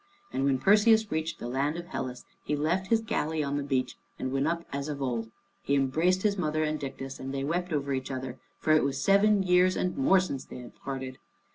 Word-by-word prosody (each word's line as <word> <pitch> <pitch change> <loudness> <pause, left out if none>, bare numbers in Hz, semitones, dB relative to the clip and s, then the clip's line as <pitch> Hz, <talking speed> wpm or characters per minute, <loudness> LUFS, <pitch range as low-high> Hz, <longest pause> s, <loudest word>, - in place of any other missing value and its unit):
And 135 - 0
when 135 -1 +3
Perseus 215 - +4
reached 160 +1 -2
the - - -6
land, 140 +5 -1
of 175 - -6
Hellas 130 -8 -5 0.2
he 150 - -1
left 170 +6 0
his 225 +1 +3
galley 160 -8 -1
on 140 0 -2
the 145 - 0
beach, 135 -2 -1 0.2
and 130 - -3
went 135 +2 +1
up 170 +1 -1
as 140 +1 -3
of 145 -2 -4
old. 120 -4 -2 0.3
He 140 - +1
embraced 160 +8 +2
his 205 -2 +1
mother 155 -2 0
and 155 0 -1
Dictys, 135 -1 -6
and 135 +1 -5
they 135 0 -2
wept 175 +5 -1
over 140 -2 -1
each 130 -1 -3
other, 130 -1 -5 0.2
for 155 - +2
it 155 - +5
was 135 0 -1
seven 200 +2 +4
years 180 0 +4
and 180 - -1
more 230 -9 +4
since 160 -8 -3
they - - -10
had 125 -1 -10
parted. 130 -1 -6
150 Hz, 230 wpm, -29 LUFS, 135-180 Hz, 0.3 s, it